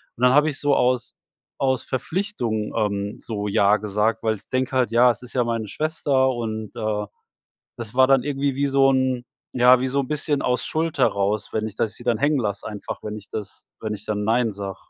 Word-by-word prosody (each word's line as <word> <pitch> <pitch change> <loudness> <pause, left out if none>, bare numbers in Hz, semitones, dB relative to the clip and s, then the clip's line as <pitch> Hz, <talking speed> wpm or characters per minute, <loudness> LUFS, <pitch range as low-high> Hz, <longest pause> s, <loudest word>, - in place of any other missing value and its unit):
und 125 - -5
dann 125 +1 +6
hab 150 +1 +6
ich 145 -3 -2
so 145 -1 +2
aus 125 -1 +1 0.4
aus 130 -2 +1
Verpflichtung, 130 - -2
ähm, 100 -1 -1
so 105 -2 -4
„Ja“ 100 +1 +4
gesagt, 105 +2 0
weil 110 -1 +1
ich 95 - -20
denke 130 0 -1
halt: 125 -3 +2
„Ja, 120 +2 +6
es 120 - -9
ist 125 - -9
ja 125 -2 +2
meine 115 -2 -2
Schwester“ 140 -2 +1
und, 110 -3 -3
äh, 110 -2 -2 0.7
das 115 0 -7
war 130 0 +6
dann 135 -2 +4
irgendwie 140 -1 -1
wie 140 0 +1
so 135 0 +4
'n, 130 -2 0 0.3
ja, 125 0 +6
wie 130 - 0
so 140 +2 +1
'n 130 - -3
bisschen 150 -1 -1
aus 125 -1 0
Schuld 160 -2 -1
heraus, 100 -3 +1
wenn 110 0 -1
ich 105 - -13
das 110 - -1
sie 120 - -11
dann 120 -3 +1
hängen 145 0 +2
lasse, 100 -3 -3
einfach 105 -2 -6
wenn 105 0 -5
ich 105 - -12
das 105 -3 -7
wenn 110 -1 -3
ich 105 +1 -10
dann 105 -1 -2
nein 115 +1 +2
sag. 100 -1 -5
120 Hz, 220 wpm, -23 LUFS, 105-135 Hz, 0.7 s, dann